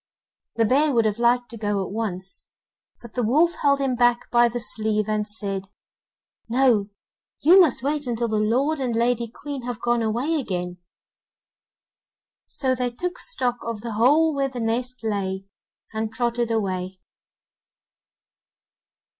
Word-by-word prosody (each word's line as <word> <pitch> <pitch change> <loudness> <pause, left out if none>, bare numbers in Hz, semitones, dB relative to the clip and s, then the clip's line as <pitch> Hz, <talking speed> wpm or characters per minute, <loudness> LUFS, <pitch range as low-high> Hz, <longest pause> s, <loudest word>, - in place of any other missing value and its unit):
The 230 - +3
bear 285 +7 +3
would 230 -2 +3
have 215 +1 0
liked 240 0 +2
to 230 - -8
go 205 -2 -1
at - - -8
once, 195 -4 -4 0.5
but 235 -2 -12
the 250 - -1
wolf 305 +10 +3
held 280 -1 +3
him 270 -2 0
back 240 0 +2
by 240 0 +5
the 240 +1 -4
sleeve, 215 -2 0
and 215 -1 -1
said: 195 -2 -3 0.8
'No, 235 -5 +3 0.5
you 365 +5 +8
must 295 -8 +2
wait 290 0 -1
until 235 0 -1
the 215 -1 -1
lord 260 +8 +1
and 250 -3 -1
lady 235 0 +1
Queen 280 +4 -7
have 245 -2 -5
gone 240 0 +1
away 245 +9 0
again.' 180 -7 -4 1.7
So 260 -2 0
they 250 -1 -1
took 360 +9 -4
stock 250 - -1
of 230 -2 -5
the 230 0 -5
hole 290 +9 +4
where 275 -1 0
the 255 -2 -7
nest 240 +2 -1
lay, 195 -3 -2 0.5
and 220 0 -2
trotted 235 0 -1
away. 190 -4 -2
235 Hz, 150 wpm, -24 LUFS, 215-255 Hz, 1.7 s, you